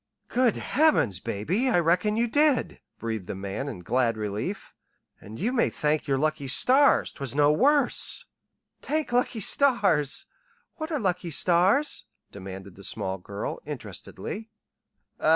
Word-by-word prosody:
"Good 245 -3 +2
heavens, 270 - +2
baby, 180 - -1
I 205 - +3
reckon 180 +6 +1
you 235 - +2
did!" 290 +1 +2 0.2
breathed 110 -5 -4
the - - -4
man 100 +8 -4
in 105 -10 -8
glad 115 +4 0
relief. 110 - -4 0.5
"And 110 +2 -11
you 230 +8 -1
may 240 - +2
thank 150 +1 -1
your 135 -1 +1
lucky 155 0 -1
stars 260 - +3
'twas 135 -2 -5
no 145 0 +4
worse." 280 - +2 0.6
"T'ank 310 -2 -2
lucky 240 -2 0
stars. 195 - +3 0.5
What 315 +1 -5
are 310 - 0
lucky 180 -4 -1
stars?" 185 - +2 0.3
demanded 95 -1 -9
the 100 - -12
small 95 0 -2
girl, 100 +3 -5
interestedly. 220 +2 -7
165 Hz, 135 wpm, -26 LUFS, -, 0.6 s, no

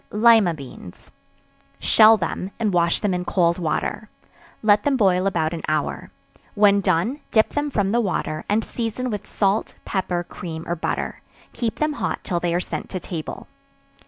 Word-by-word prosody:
Lima 215 -5 +5
Beans. 130 - -12 0.7
Shell 220 0 +6
them, 185 0 -3
and 215 -4 0
wash 170 -1 +2
them 205 -3 +1
in 180 0 -1
cold 170 -1 +1
water; 180 +5 -2 0.5
let 210 -1 +5
them 280 +1 +1
boil 190 -4 +3
about 165 -4 0
an 165 - -4
hour; 155 -1 -2 0.5
when 200 -1 +5
done, 190 - +1
dip 220 -1 +3
them 290 0 -2
from 205 -7 0
the 240 +2 +2
water, 185 -6 -2
and 215 +2 +2
season 240 +2 -3
with 210 -1 -5
salt, 200 +1 0
pepper, 180 -2 -1
cream 165 -2 -7
or 170 - -1
butter; 165 - -3 0.3
keep 230 -3 -2
them 305 0 0
hot - - -3
till 175 -3 -1
they 175 0 -1
are - - +2
sent - - -5
to 185 - -4
table. 165 -3 -6
195 Hz, 170 wpm, -22 LUFS, 170-220 Hz, 0.7 s, Shell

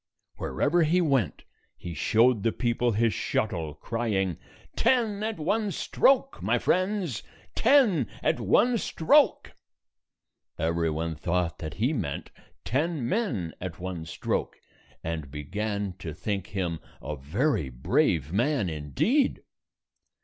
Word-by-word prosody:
Wherever 170 +4 +1
he 165 +3 +3
went, 135 - +1 0.3
he 85 - -7
showed 115 +5 +3
the 115 - +2
people 120 0 0
his 110 +1 +2
shuttle, 85 -9 -2
crying, 95 -2 -1 0.4
"Ten 230 -4 +2
at 220 0 -2
one 205 +7 0
stroke, 275 +7 +2
my - - +2
friends! 185 - 0 0.3
Ten 215 - +4 0.2
at - - +2
one 230 - +3
stroke!" 280 - +3 1.0
Every 85 +1 0
one 80 +1 -2
thought 85 +1 -1
that 80 0 -6
he 120 - +1
meant 85 - -3 0.3
ten 145 0 0
men 125 - -1
at 90 -3 -5
128 - - -23
one 90 -3 -5
stroke, - - -2 0.4
and 80 -3 -4
began 100 +7 -3
to 80 -5 -6
think 100 +1 -3
him 90 -5 -2 0.2
a 75 - -5
very 95 - 0
brave 80 - +1
man, 120 - +1
indeed. 80 - 0
110 Hz, 125 wpm, -27 LUFS, -, 1.0 s, Ten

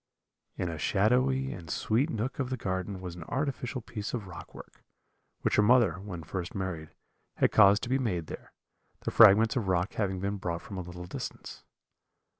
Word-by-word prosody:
"In 90 - -1
a 80 -2 -5
shadowy 130 - +2
and 85 -4 -10
sweet 120 - +1
nook 120 +2 -3
of 130 -2 -1
the 130 - -2
garden 95 -2 -3
was 90 -2 -6
an 85 - -8
artificial 130 - -3
piece 110 0 -5
of 110 -5 -5
rock 95 - -10
work, - - -13 0.6
which - - +1
her - - +6
mother, 120 -3 +4
when 95 -4 -7
first 85 +2 -5
married, 90 -5 -4 0.4
had - - +2
caused 100 -1 +6
to - - -3
be 130 +1 +2
made 90 -10 -1
there, - - -9 0.5
the - - -3
fragments 110 +1 +7
of 115 -6 -1
rock 90 0 +1
having 95 -3 -1
been 100 +2 -2
brought 85 -3 -4
from 100 -3 -7
a - - -2
little 90 0 -8
distance. - - -7
100 Hz, 190 wpm, -29 LUFS, 90-120 Hz, 0.6 s, fragments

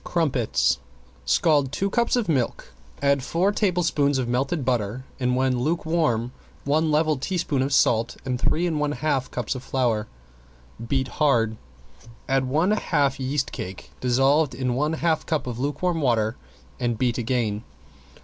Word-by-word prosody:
~CRUMPETS~ 140 -10 +1 0.5
Scald 140 - +3
two 195 +7 -1
cups 235 +1 +2
of 240 -3 0
milk, 130 - -1 0.3
add 140 -1 +3
four 175 +9 +1
tablespoons 175 -9 +1
of 130 -2 -1
melted 135 +4 -1
butter 120 0 -1
and 125 -1 +1
when 130 -1 +1
lukewarm 155 -5 0 0.3
one 155 +3 +1
level 155 0 +2
teaspoon 155 -4 -1
of 135 +2 -1
salt 115 -3 +2
and 125 -2 -2
three 170 +3 +1
and 160 -4 0
one 150 0 0
half 145 -4 -1
cups 125 -3 -3
of 130 - -6
flour. 120 -5 0 0.8
Beat 130 +1 0
hard, 120 -6 +2 0.7
add 135 -1 +2
one 155 +9 +1
half 140 -10 +1
yeast 135 +1 -1
cake, 95 +1 -7
dissolved 135 +3 +3
in 125 -1 -1
one 150 +5 0
half 160 0 0
cup 155 -5 0
of 120 -2 -5
lukewarm 160 +5 -1
water 115 -4 +1 0.4
and 120 -2 -1
beat 125 +1 0
again. 115 -3 -1
135 Hz, 150 wpm, -24 LUFS, 125-155 Hz, 0.8 s, Scald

